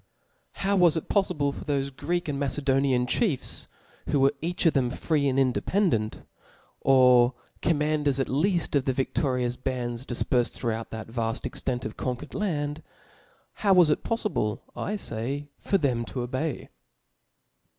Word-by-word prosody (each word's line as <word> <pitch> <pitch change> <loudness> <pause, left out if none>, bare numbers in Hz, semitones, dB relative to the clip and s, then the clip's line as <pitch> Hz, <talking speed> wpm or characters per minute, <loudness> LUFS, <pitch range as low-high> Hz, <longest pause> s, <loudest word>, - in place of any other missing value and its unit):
How 200 +1 0
was 175 -4 +5
it 160 - -5
poflible 175 -8 +1
for - - -8
thofe 140 -2 -2
Greek 175 +5 -2
and 140 -2 -2
Macedonian 135 -2 +1
chiefs, 145 - 0 0.4
who 145 - +2
were 135 +1 +4
each 175 +3 -2
of 165 - +5
them 130 -3 +2
free 145 +2 0
and 135 -1 +1
independent^ 130 - +1 0.5
or 125 -2 +5 0.3
commanders 150 -3 +1
at 135 - +1
lead 170 +4 +1
of 140 -2 +2
the 130 - +1
vidlorious 125 -2 0
bands 125 -1 -2
difperfed 120 0 0
throughout 115 -2 -3
that 110 0 -7
vafl: 115 -1 -2
ex - - -4
tent 125 -2 -2
of 110 - -6
conquered 125 -2 -4
land, 150 -7 -2 0.8
how 200 -2 +5
was 175 -4 +6
it - - 0
poflible, 165 - -1
I 210 +3 -2
fay, 140 - -4
for 195 - +2
them 130 -8 0
to 125 - -4
obey 130 +5 -3
140 Hz, 150 wpm, -27 LUFS, 125-160 Hz, 0.8 s, was